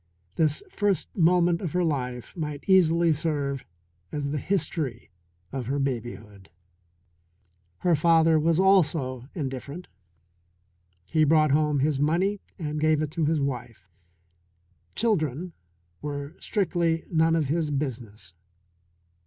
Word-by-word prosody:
This 155 -2 +1
first 205 -3 -1
moment 175 -1 +3
of 175 -5 -4
her 180 0 +2
life 125 -6 -3
might 150 -4 -4
easily 170 -3 +4
serve 145 -3 -2 0.5
as 140 -1 -3
the 150 - -1
history 150 - -2 0.4
of 130 -4 -4
her 140 +2 -1
babyhood. 110 -7 -4 1.3
Her 175 -2 +3
father 160 0 +4
was 165 +2 +2
also 150 -10 +2
indifferent. 140 +2 -5 1.2
He 155 - +2
brought 155 -1 +4
home 150 -1 +2
his 145 -1 +1
money 180 +7 +1 0.2
and 150 -3 -3
gave 155 0 +3
it 150 - -4
to 160 0 0
his 155 +1 +1
wife 125 -8 -4 1.1
children 175 - 0 0.5
were 145 +1 -5
strictly 170 -5 0
none 165 0 +3
of 160 -2 +1
his 160 0 0
business. 115 -10 -5
155 Hz, 120 wpm, -26 LUFS, 140-170 Hz, 1.3 s, easily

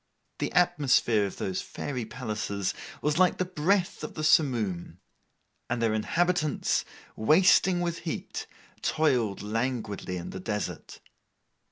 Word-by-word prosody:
The - - -1
atmosphere 140 - +3
of 95 - -9
those 95 -1 -2
Fairy 125 -5 -5
palaces 105 -5 -3 0.3
was 150 +2 +1
like 185 -1 +4
the 185 - 0
breath 180 +2 0
of - - -6
the 155 - -4
simoom: 110 - +2 0.7
and 120 0 -1
their 115 -2 +2
inhabitants, 165 - +1 0.3
wasting 175 - +4
with 170 -1 -2
heat, 165 - -5 0.3
toiled 125 -12 +1
languidly 110 -4 -2
in 85 - -6
the 95 - -6
desert. 105 +2 -4
125 Hz, 125 wpm, -28 LUFS, 105-165 Hz, 0.7 s, like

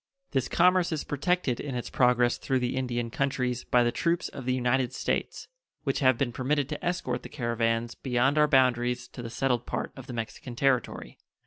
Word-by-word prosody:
This 130 -2 0
commerce 180 0 +3
is 155 -2 -2
protected 145 -3 0
in 140 -3 -4
its 120 - -4
progress 125 -1 +3
through 135 - 0
the 125 -1 -1
Indian 120 -3 -2
countries 125 -2 -1
by 125 -1 +4
the 120 - +2
troops 170 +7 0
of 130 - -8
the 130 - +1
United 125 0 +1
States, - - -2 0.4
which 135 - 0
have 130 -3 +4
been 125 -2 0
permitted 135 +3 0
to 150 - -5
escort 150 -9 -1
the - - -9
caravans 115 -2 -1
beyond 130 +4 +1
our 150 - +5
boundaries 125 -3 +2
to - - -9
the 115 - -6
settled 125 0 -1
part - - -3
of 135 -1 -10
the 125 - -6
Mexican 120 +2 -6
territory. 125 - 0
125 Hz, 195 wpm, -28 LUFS, 120-140 Hz, 0.4 s, our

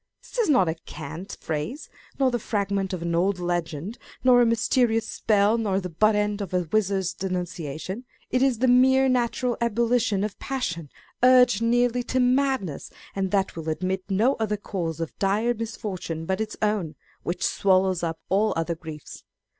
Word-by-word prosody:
This - - -7
is 450 - +2
not 255 - +4
a 160 - +1
cant 165 +2 -8
phrase, 160 - -4 0.3
nor 265 -2 +3
the 240 - -1
fragment 200 -3 -1
of 180 -3 -4
an 170 0 -1
old 185 +3 +2
legend, 175 +3 -3 0.2
nor 250 -1 +6
a 240 - +4
mysterious 230 0 +2
spell, 210 +1 +2
nor 200 -4 0
the 180 -2 -6
butt 215 +6 +3
end 210 0 0
of 190 -2 -4
a 180 - +2
wizard's 195 -3 +1
denunciation. 180 - -4 0.3
It 255 - +2
is 265 -3 +3
the 255 +3 +2
mere 260 +2 +5
natural 250 -1 0
ebullition 235 -2 +1
of 210 -1 -4
passion, 175 - -3 0.3
urged 250 -3 +6
nearly 245 +1 +2
to 255 - 0
madness, 255 - +1 0.3
and 195 -1 -1
that 195 0 0
will 160 -1 -4
admit 185 +4 -1
no 220 +8 +3
other 210 -1 0
cause 170 -5 -4
of 165 -2 -4
dire 210 +5 +2
misfortune 200 -8 -5
but 190 +4 -1
its 220 0 -4
own, 200 -8 0 0.3
which 175 +1 -2
swallows 185 -2 +2
up 165 -1 -2
all 205 +3 +2
other 165 +1 -1
griefs. 160 -2 -10
200 Hz, 170 wpm, -25 LUFS, 180-240 Hz, 0.3 s, nor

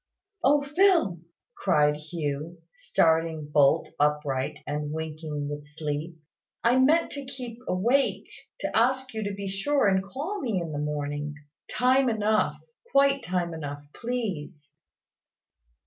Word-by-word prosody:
"O 285 +2 +4
Phil!" 320 - +3 0.4
cried 150 -5 +3
Hugh, 155 +1 -4
starting 160 -1 +1
bolt 145 -2 +4
upright 145 -1 +1
and 150 0 -3
winking 155 -2 -4
with 145 0 -6
sleep, 150 +2 -4 0.5
"I 245 +3 +4
meant 315 +6 +4
to 280 - -5
keep 250 -3 -7
awake, 240 +10 +2 0.4
to - - -2
ask 255 +2 +2
you 220 -1 -3
to 200 -1 -3
be 200 0 -5
sure 205 +8 +1
and 190 -1 +3
call 300 - -4
me 220 -7 0
in 165 -2 -4
the 145 - -3
morning, 145 0 -3 0.3
time 255 +1 +3
enough, 215 -1 +1 0.4
quite 275 0 +4
time 175 -2 -1
enough, 145 -2 -6
please." 190 - -4
175 Hz, 130 wpm, -27 LUFS, 150-250 Hz, 0.5 s, O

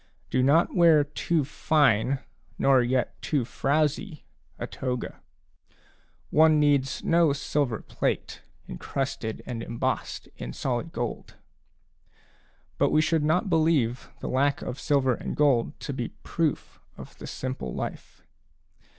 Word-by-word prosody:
Do 130 - +2
not 145 +6 +4
wear 165 -4 +6
too 150 +1 -1
fine, 140 -3 +2 0.4
nor 135 -2 +4
yet 125 +1 -1
too 140 -6 0
frowzy, 150 - -1 0.3
a - - -4
toga. 125 -2 -4 1.1
One 155 0 +5
needs 140 -3 +2
no 165 -3 +4
silver 140 -4 -1
plate, - - -2 0.3
encrusted 130 - -4
and 120 -2 -5
embossed 115 0 -3
in - - -6
solid 130 - -2
gold; 120 -4 -5 1.4
but - - +4
we - - +3
should 155 0 +2
not 160 +6 +2
believe 155 -8 +1
the - - -4
lack 140 +2 +1
of 125 - -5
silver 135 -4 +2
and - - -5
gold 140 -3 +2
to 140 - -4
be 125 -3 -3 0.2
proof 160 -3 -2 0.2
of - - -11
the - - -8
simple 130 - -4
life. - - -6
140 Hz, 125 wpm, -26 LUFS, 125-155 Hz, 1.4 s, wear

